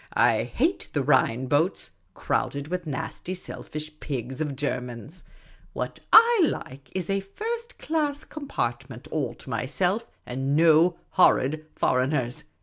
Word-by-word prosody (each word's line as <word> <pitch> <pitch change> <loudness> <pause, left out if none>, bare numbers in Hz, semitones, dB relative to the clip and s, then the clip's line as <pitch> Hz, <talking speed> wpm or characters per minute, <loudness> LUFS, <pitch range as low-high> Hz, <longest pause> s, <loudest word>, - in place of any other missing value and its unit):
I - - +4
hate - - 0
the - - +1
Rhine 125 +3 +3
boats, 150 +8 +1 0.2
crowded 140 +1 -1
with 180 -1 -3
nasty 155 +5 -4
selfish 155 -3 -7
pigs 130 0 -4
of 145 -3 -2
Germans. 130 +3 -4 0.5
What - - -4
/like 385 - +4
is 185 -3 -2
a 195 0 +1
first 455 - -5
class 295 -2 -1
compartment 130 - -4
all 130 -6 -1
to - - -12
myself, 180 - 0 0.2
and 135 +3 -1
no 165 +2 +5
horrid 155 -3 +3
foreigners. 125 -1 0
155 Hz, 125 wpm, -26 LUFS, 130-190 Hz, 0.5 s, no